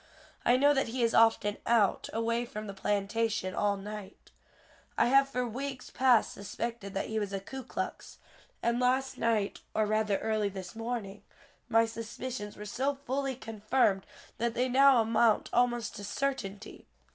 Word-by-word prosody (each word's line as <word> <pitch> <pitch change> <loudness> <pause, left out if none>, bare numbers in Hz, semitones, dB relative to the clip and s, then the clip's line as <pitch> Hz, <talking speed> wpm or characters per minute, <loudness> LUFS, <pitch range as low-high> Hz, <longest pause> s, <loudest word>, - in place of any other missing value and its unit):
I 245 - +4
know 285 +2 +5
that 270 -1 +1
he 240 +1 -1
is 230 - +2
often 225 -2 +4
out, 225 -4 +2
away 230 +1 0
from 215 -3 -6
the 200 - -6
plantation, 205 0 -1
all 205 -1 +1
night. 210 0 -9 0.7
I - - +4
have 275 +1 +5
for 250 -2 -1
weeks 260 +2 -5
past 255 -3 +3
suspected 205 0 -5
that 195 - -1
he 220 0 -2
was 205 -2 -3
a 195 - -1
Ku 265 +7 -7
Klux, 245 - -5 0.5
and 235 +1 +1
last 260 +1 +1
night, 220 -3 0 0.2
or 215 - +3
rather 215 -1 +1
early 215 -2 0
this 190 -1 -8
morning, 225 -3 -4 0.5
my 225 -1 +5
suspicions 225 -1 -6
were 210 - -7
so 270 +7 -1
fully 270 0 -2
confirmed 215 -3 0 0.3
that 235 0 0
they 250 +1 +1
now 270 -1 +6
amount 225 0 +2
almost 240 -1 +1
to 205 - -7
certainty. 220 -3 -4
225 Hz, 160 wpm, -30 LUFS, 205-250 Hz, 0.7 s, now